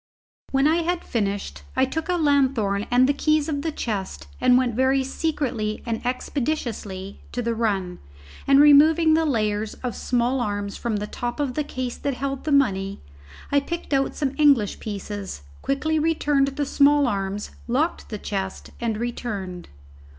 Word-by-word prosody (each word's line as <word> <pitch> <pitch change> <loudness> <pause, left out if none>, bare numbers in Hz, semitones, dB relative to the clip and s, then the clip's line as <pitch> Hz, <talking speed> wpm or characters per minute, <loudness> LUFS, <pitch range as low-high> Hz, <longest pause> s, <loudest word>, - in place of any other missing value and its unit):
When 270 +1 +2
I 320 +2 +3
had 345 +1 -1
finished, 205 -3 -2
I 260 - +4
took 320 +6 -4
a 360 - +2
lanthorn 260 - +2
and 245 +1 +5
the 285 - +3
keys 305 +1 +1
of 285 -3 -2
the 320 +1 -2
chest 195 - -4 0.2
and 250 0 +6
went 250 -2 +1
very 260 +3 +2
secretly 260 -7 -2
and 230 -2 -3
expeditiously 240 -7 -3
to 245 - -3
the 235 0 0
run, 200 -6 -1 0.5
and 275 0 +6
removing 310 +3 +7
the 320 +1 +3
layers 215 -4 0
of 245 -2 -2
small 245 +1 0
arms 205 -2 -2
from 235 -2 -2
the 210 0 -2
top 240 +4 -4
of 280 -3 -1
the 300 - -1
case 255 -3 -4
that 280 -2 -2
held 275 +1 -4
the 310 - -1
money, 200 -8 +2 0.5
I 285 - +5
picked 335 +2 -5
out 270 0 +1
some 275 -2 -1
English 275 -9 +4
pieces, 205 - -6 0.2
quickly 310 +3 0
returned 295 -3 +2
the 275 +1 -2
small 285 +1 +4
arms, 200 -2 -2 0.2
locked 290 +8 0
the 215 - -4
chest, 195 -2 -4
and 230 -2 -1
returned. 210 -6 -4
255 Hz, 165 wpm, -24 LUFS, 210-285 Hz, 0.5 s, removing